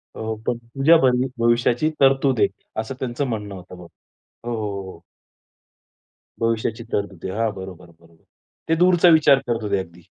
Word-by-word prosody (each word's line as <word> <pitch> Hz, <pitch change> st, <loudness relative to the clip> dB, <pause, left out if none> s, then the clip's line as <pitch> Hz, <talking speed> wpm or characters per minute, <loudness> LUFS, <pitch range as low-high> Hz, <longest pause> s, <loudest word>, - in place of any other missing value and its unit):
हो, 110 Hz, 0 st, -4 dB
पण 120 Hz, -, 0 dB
तुझ्या 135 Hz, +8 st, +3 dB
भवि 125 Hz, 0 st, +2 dB
भविष्याची 120 Hz, +5 st, +2 dB
तरतूद 135 Hz, -2 st, +3 dB
आहे -, -, +5 dB, 0.3 s
असं 110 Hz, +4 st, -7 dB
त्यांचं 130 Hz, +2 st, -2 dB
म्हणणं 105 Hz, -4 st, -4 dB
होतं. 90 Hz, 0 st, -11 dB
हो, 90 Hz, -1 st, -12 dB, 0.7 s
हो, 105 Hz, -3 st, -4 dB
हो. 95 Hz, -3 st, -11 dB, 1.4 s
भविष्याची 115 Hz, 0 st, -1 dB
तरतूद 100 Hz, -4 st, -3 dB
आहे. 95 Hz, -, -4 dB
हां, 115 Hz, -1 st, +1 dB
बरोबर, 95 Hz, -2 st, -10 dB
बरोबर. 85 Hz, -1 st, -24 dB, 0.5 s
ते 165 Hz, -, +4 dB
दूरचा 175 Hz, +1 st, +5 dB
विचार 155 Hz, -4 st, +6 dB
करत 115 Hz, -2 st, -1 dB
होते 100 Hz, -1 st, 0 dB
अगदी. 85 Hz, -1 st, -9 dB
115 Hz, 155 wpm, -22 LUFS, 100-135 Hz, 1.4 s, विचार